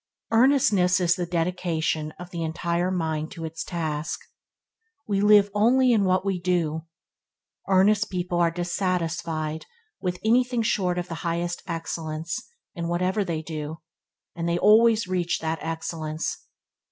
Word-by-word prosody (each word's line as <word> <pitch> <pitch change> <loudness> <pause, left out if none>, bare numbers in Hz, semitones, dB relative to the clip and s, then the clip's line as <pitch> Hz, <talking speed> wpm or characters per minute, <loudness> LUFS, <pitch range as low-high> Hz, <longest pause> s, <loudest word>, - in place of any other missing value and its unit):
Earnestness 225 -7 +4
is 175 -1 +3
the 175 -1 -3
dedication 165 -3 -1
of 180 0 -10
the 170 - -4
entire 170 +2 -1
mind 160 -4 -2
to 165 -2 -6
its 160 0 -5
task. 160 -3 -3 0.9
We 200 -2 +1
live 205 -1 +6
only 245 +5 +4
in 210 -4 +3
what 185 +1 +2
we 195 -2 0
do. 165 -3 0 0.8
Earnest 200 +2 +4
people 180 -1 -2
are 170 -1 +4
dissatisfied 170 -3 -2 0.3
with 180 -2 -2
anything 245 +1 +3
short 185 -5 +1
of 175 0 -2
the 165 - -5
highest 170 +1 -2
excellence 165 -1 -4 0.4
in 170 -3 -4
whatever 180 +4 0
they 165 -4 -3
do, 155 0 -6 0.5
and 170 0 -2
they 170 - +1
always 220 +3 +5
reach 180 -2 0
that 160 0 -2
excellence. 160 -1 -4
175 Hz, 140 wpm, -25 LUFS, 165-195 Hz, 0.9 s, live